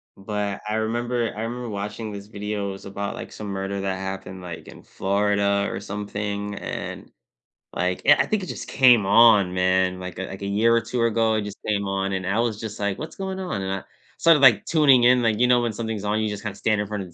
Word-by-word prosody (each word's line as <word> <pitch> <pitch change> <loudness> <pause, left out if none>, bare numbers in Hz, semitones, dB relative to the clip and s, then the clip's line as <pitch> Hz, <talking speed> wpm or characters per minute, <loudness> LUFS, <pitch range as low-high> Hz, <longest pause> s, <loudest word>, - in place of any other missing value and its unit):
but 100 0 -4
I 105 - -1
remember 120 +2 -1
I 110 - -5
remember 120 +1 -4
watching 105 +2 -5
this 100 0 -8
video, 105 -1 -4
it - - -3
was 95 - -11
about, 100 +1 -4
like, - - -8
some 105 - -8
murder 100 0 -3
that 95 -1 -2
happened, 95 -1 -6
like, 85 -2 -8
in - - -13
Florida 100 0 0
or - - -4
something, 105 0 -4
and, - - -6 0.6
like, 90 +1 -1
yeah, 150 +1 +7
I - - +2
think 215 -2 -1
it 185 - -6
just - - -6
came 125 -6 +5
on, 100 -3 +6
man, 95 0 +1
like 90 0 -7
a 95 - -3
like 95 +1 -9
a 100 - -3
year 110 +4 +3
or 115 - +3
2 120 +1 -2
ago, 115 -1 +2
it 110 - 0
just 105 -1 -8
came 100 -2 0
on, 95 0 -1
and 95 -1 -2
I 100 +4 0
was 115 -3 0
just 110 -2 -6
like, 100 -1 -1
“What's 155 +1 -7
going 190 -1 -4
on?” 180 - -3
And 95 - -3
I 95 -1 -3 0.3
started, 165 -2 +5
like, 130 -5 +6
tuning 140 -6 +5
in, 125 +1 +5
like, 115 -2 +1
you 125 - +5
know, 125 -1 +4
when 120 -2 -1
something's 110 -1 -4
on, 105 +1 0
you 110 -1 0
just 105 0 -5
kinda 105 -3 -4
stand 105 -1 +1
in 105 - -4
front 105 -1 -4
of 90 -3 -13
105 Hz, 245 wpm, -24 LUFS, 100-115 Hz, 0.6 s, yeah